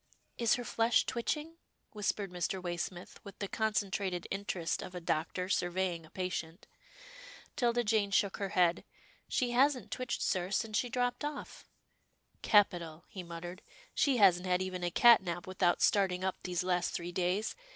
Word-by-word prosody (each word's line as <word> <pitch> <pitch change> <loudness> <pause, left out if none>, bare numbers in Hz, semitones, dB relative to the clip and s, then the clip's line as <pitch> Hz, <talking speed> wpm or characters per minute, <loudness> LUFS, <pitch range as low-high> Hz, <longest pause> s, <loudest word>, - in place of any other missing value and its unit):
"Is 235 -2 +4
her 245 - -4
flesh 230 0 +2
twitching?" 300 +7 -3 0.3
whispered 205 -2 -2
Mr. 180 +2 -2
Way 175 -1 -3
smith, 175 0 -6
with 200 - -11
the 200 - -3
concentrated 195 -4 -1
interest 195 -4 -2
of 185 - -8
a - - -3
doctor 170 +2 -2
sur 180 -2 +1
veying 175 -3 -2
a - - -20
patient. 180 -1 -4 0.9
'Tilda 240 -1 +1
Jane 210 -2 +2
shook 200 0 +1
her 200 -1 -3
head. 180 -3 +2 0.2
" - - -31
She 245 -1 0
hasn't 260 +1 +2
twitched, 255 -2 -2
sir, 180 -1 0
since 215 +2 -1
she 245 - +1
dropped 245 +2 -1
off." 295 -1 -6 0.4
" - - -43
Capital," 175 -6 +3
he 190 - -7
muttered, 175 +1 -8 0.2
" - - -26
she 275 -3 +4
hasn't 185 -3 +5
had 180 0 +2
even 185 -1 -4
a 175 - +1
cat 235 +6 +7
nap 175 -2 -4
without 185 -1 +1
starting 185 -3 +2
up 190 -1 -1
these 180 0 -2
last 180 -1 0
three 175 +1 -4
days. 185 +4 -1
190 Hz, 175 wpm, -32 LUFS, 175-220 Hz, 0.9 s, cat